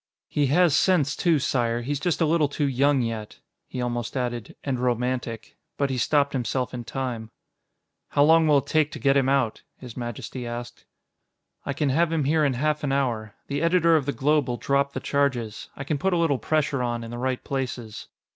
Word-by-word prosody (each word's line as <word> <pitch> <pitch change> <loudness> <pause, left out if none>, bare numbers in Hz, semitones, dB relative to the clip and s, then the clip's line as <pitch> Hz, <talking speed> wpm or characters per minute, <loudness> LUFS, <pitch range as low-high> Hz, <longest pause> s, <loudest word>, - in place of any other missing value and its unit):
"He 145 -2 +1
has 165 +2 +4
sense, 155 -8 +3
too, 170 -3 +2
Sire; 120 -5 0
he's 140 +2 -2
just 175 +1 -1
a - - +5
little 155 -1 +3
too 145 +1 -1
young 135 0 +2
yet." 110 -2 -5 0.3
He 125 - -6
almost 120 0 -2
added 120 -3 -3
"and 135 -3 -2
romantic," 125 -2 -2 0.2
but 140 -1 0
he 130 - -1
stopped 140 +3 +2
himself 125 0 -1
in 120 -1 -5
time. 120 -4 -4 0.8
"How 145 - +3
long 160 +1 +5
will 150 -2 +5
it 140 - 0
take 155 0 +2
to - - -6
get 135 -1 +3
him 135 -1 +3
out?" 135 -5 +1 0.2
His 125 -3 -10
Majesty 120 +1 -5
asked. 120 0 -7 0.8
"I 140 - 0
can 145 0 0
have 165 +5 +2
him 160 -3 +1
here 155 +3 +2
in 140 -2 +2
half 150 +4 0
an 140 - 0
hour. 120 -6 -1
The 140 +1 -3
editor 170 -1 +4
of 145 -3 +1
the - - +2
Globe 150 +2 +1
will 120 -1 -2
drop 140 +1 0
the - - -3
charges. 130 -7 -1
I 135 - -6
can 145 +1 -2
put 190 +3 +1
a - - +2
little 160 -6 +2
pressure 155 -3 0
on 120 -1 -2
in 115 - -8
the 120 - -5
right 130 0 -2
places." 125 -5 -4
135 Hz, 210 wpm, -25 LUFS, 120-150 Hz, 0.8 s, a